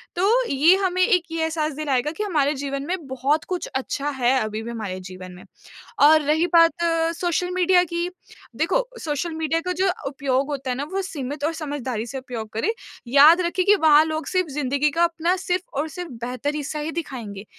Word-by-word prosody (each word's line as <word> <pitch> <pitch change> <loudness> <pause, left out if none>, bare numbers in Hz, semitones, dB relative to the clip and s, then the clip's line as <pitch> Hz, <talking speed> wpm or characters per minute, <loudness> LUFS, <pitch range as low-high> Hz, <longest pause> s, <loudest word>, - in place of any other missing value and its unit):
तो 385 +5 +2 0.2
ये 300 +7 +5
हमें 370 -2 0
एक 365 -3 +3
ये 325 -1 -1
एहसास 315 -2 -1
दिलाएगा 290 -1 -1
कि 420 +6 -4
हमारे 300 -7 +1
जीवन 275 0 -4
में 360 -3 -3
बहुत 270 +4 0
कुछ 365 -1 -3
अच्छा 275 +2 -2
है 245 -1 +3
अभी 215 -1 -3
भी 235 - -6
हमारे 200 -5 -5
जीवन 185 0 -10
में। 180 - -13 0.6
और 310 +1 +7
रही 310 +4 +1
बात 335 0 +5 0.3
सोशल 355 +1 -1
मीडिया 360 0 +4
की, 345 +1 -3 0.5
देखो - - 0
सोशल 315 +2 -3
मीडिया 320 0 0
का 365 - -3
जो 385 - +3 0.2
उपयोग 270 0 -1
होता 275 -2 -4
है - - -1
ना 280 - -2
वो 390 +1 -1
सीमित 290 -5 -6
और 330 - 0
समझदारी 280 -8 -4
से 270 - -6
उपयोग 235 -4 -7
करें। 225 - 0 0.4
याद 295 +7 +7
रखें 355 +1 0
कि 410 +1 +6
वहाँ 310 -4 +6
लोग 315 0 -3
सिर्फ़ 365 -4 0
ज़िंदगी 280 +1 +1
का 335 +4 +1
अपना 340 +1 +1
सिर्फ़ 360 -1 -1 0.2
और 310 - -1
सिर्फ़ 345 0 -7
बेहतर 255 +4 -3
हिस्सा 300 +1 -4
ही 300 +2 -3
दिखाएँगे। 230 -11 -6
300 Hz, 200 wpm, -23 LUFS, 265-345 Hz, 0.6 s, और